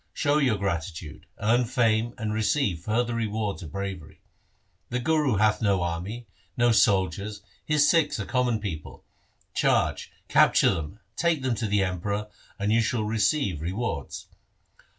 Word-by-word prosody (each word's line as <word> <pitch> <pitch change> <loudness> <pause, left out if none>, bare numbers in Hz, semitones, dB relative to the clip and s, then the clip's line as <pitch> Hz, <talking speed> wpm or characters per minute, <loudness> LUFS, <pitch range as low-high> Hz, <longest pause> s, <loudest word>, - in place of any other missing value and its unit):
Show 145 0 +2
your 130 -7 +2
gratitude, 85 -5 -4
earn 120 +4 +2
fame 115 -2 +1
and 110 -3 -3
receive 110 - +1
further 115 +6 -1
rewards 110 -3 -2
of 80 -5 -8
bravery. 95 -4 -6 0.7
The 125 - -1
Guru 145 -1 +1
hath 105 +2 +2
no 100 -4 +2
army, 90 +8 -4 0.3
no 120 0 +4
soldiers, 100 -1 +1 0.2
his 150 -1 +3
Sikhs 165 -8 +2
are 100 - -3
common 125 -3 +1
people. 85 -8 -6 0.5
Charge, - - +1 0.2
capture - - +5
them, 80 +6 -6 0.2
take 165 -5 +1
them 130 -2 +1
to 110 0 -2
the 100 -1 +2
Emperor, 100 +3 -2 0.3
and 105 +1 0
you 115 - +4
shall 115 0 0
receive 105 - 0
re 85 +3 -3
wards.' 105 - -4
105 Hz, 150 wpm, -26 LUFS, 95-120 Hz, 0.7 s, capture